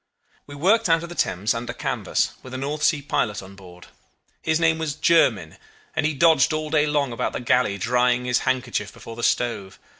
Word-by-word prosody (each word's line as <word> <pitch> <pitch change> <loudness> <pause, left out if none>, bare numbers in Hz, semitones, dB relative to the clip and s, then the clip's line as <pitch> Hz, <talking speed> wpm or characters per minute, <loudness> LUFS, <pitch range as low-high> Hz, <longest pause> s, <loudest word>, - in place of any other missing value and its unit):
"We 145 - -10
worked 185 +7 +2
out 165 0 +3
of 170 - -7
the - - -7
Thames 95 - 0
under 115 +1 -5
canvas, - - -1
with 130 0 -9
a - - -3
North 145 +3 -4
Sea 150 -1 +2
pilot 105 -8 -1
on 95 +1 -12
board. 90 -2 -14 0.6
His 160 0 0
name 165 -1 +2
was 155 -3 -3
Jermyn, 115 - +2 0.4
and 150 - +1
he 155 - -2
dodged 160 +2 +4
all 155 0 -3
day 150 -1 +3
long 145 -3 0
about 115 - -3
the - - -3
galley 125 -4 +1
drying 125 +3 +1
his 125 -1 +1
handkerchief 125 -5 -2
before 115 - -11
the 120 - -7
stove. 110 -6 -1
130 Hz, 205 wpm, -23 LUFS, 115-155 Hz, 0.6 s, dodged